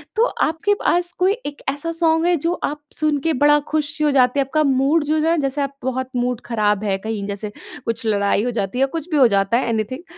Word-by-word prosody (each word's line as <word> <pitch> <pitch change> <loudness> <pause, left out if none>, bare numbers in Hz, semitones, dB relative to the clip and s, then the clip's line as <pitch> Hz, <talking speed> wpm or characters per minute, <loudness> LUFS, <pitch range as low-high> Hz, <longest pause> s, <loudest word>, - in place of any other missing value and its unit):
तो 450 +2 +4 0.2
आपके 325 +6 0
पास 350 0 +1
कोई 370 +2 +3
एक 290 0 -6
ऐसा 290 +4 -3
सॉन्ग 325 0 +2
है 350 0 +3
जो 335 - +1
आप 295 +1 -2
सुन 305 -1 +1
के 325 +3 0
बड़ा 295 +2 +4
खुश 305 0 -1
हो 300 -1 +3
जाते 255 0 +3
हैं। 275 - +2
आपका 310 +3 +1
मूड 275 +3 +2
जो 305 +1 0
है 335 0 +2
जैसे 275 +1 -1
आप 275 0 -3
बहुत 260 0 -2
मूड 245 -1 -1
ख़राब 210 -3 0
है, 195 -2 0
कहीं 210 0 -4
जैसे 205 +1 -5 0.3
कुछ 230 0 -3
लड़ाई 200 0 +1
हो 245 - -1
जाती 220 -1 -3
है 260 - 0
या 270 - +4
कुछ 325 +2 -6
भी 305 - +2
हो 265 -3 +7
जाता 200 +1 +2
है। 245 -1 -1
एनीथिंग 230 +7 -2
275 Hz, 240 wpm, -20 LUFS, 230-310 Hz, 0.3 s, हो